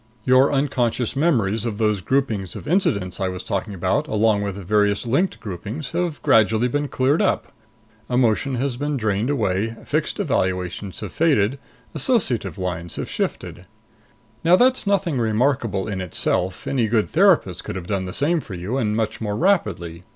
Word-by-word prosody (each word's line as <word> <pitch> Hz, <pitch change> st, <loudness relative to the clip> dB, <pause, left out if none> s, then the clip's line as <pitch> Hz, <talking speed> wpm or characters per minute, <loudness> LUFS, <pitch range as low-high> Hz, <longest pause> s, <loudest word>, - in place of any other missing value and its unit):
Your 130 Hz, +3 st, +4 dB
unconscious 130 Hz, -4 st, 0 dB
memories 115 Hz, -, +1 dB
of 115 Hz, -3 st, -3 dB
those 105 Hz, -3 st, +1 dB
groupings 110 Hz, -6 st, -1 dB
of -, -, -8 dB
incidents 105 Hz, -, 0 dB
I 95 Hz, -, 0 dB
was 90 Hz, 0 st, -5 dB
talking 100 Hz, +1 st, -3 dB
about, 95 Hz, -, 0 dB
along 110 Hz, -4 st, +2 dB
with 100 Hz, -2 st, -3 dB
various 105 Hz, +2 st, +1 dB
linked 140 Hz, +11 st, 0 dB
groupings, 110 Hz, -, -6 dB
have 175 Hz, -4 st, -2 dB
gradually 110 Hz, +2 st, +4 dB
been 145 Hz, +3 st, -1 dB
cleared 135 Hz, +3 st, +1 dB
up. -, -, 0 dB, 0.6 s
Emotion 125 Hz, +1 st, +1 dB
has 125 Hz, 0 st, -2 dB
been 145 Hz, +1 st, -2 dB
drained 110 Hz, +1 st, 0 dB
away, 110 Hz, -4 st, 0 dB
fixed -, -, -1 dB
evaluations 90 Hz, +1 st, -2 dB
have -, -, -5 dB
faded. 135 Hz, -6 st, +2 dB, 0.3 s
Associative 120 Hz, -, 0 dB
lines 90 Hz, -2 st, -4 dB
have -, -, -5 dB
shifted. 90 Hz, -, -4 dB, 0.8 s
"Now 170 Hz, +2 st, +6 dB
that's 250 Hz, +1 st, +3 dB
nothing 180 Hz, -8 st, +1 dB
remarkable 115 Hz, -3 st, 0 dB
in 95 Hz, -3 st, -3 dB
itself. 90 Hz, +1 st, -1 dB
Any 125 Hz, -5 st, +1 dB
good 110 Hz, -1 st, +1 dB
therapist 170 Hz, -, +3 dB
could -, -, -6 dB
have 95 Hz, -2 st, -5 dB
done 95 Hz, 0 st, -2 dB
the 90 Hz, -, -5 dB
same 160 Hz, -, +1 dB
for 105 Hz, -10 st, -8 dB
you, 100 Hz, +10 st, -3 dB
and 105 Hz, -3 st, 0 dB
much 110 Hz, -1 st, -2 dB
more 105 Hz, -1 st, -2 dB
rapidly. 95 Hz, -, 0 dB
110 Hz, 165 wpm, -22 LUFS, 95-140 Hz, 0.8 s, Now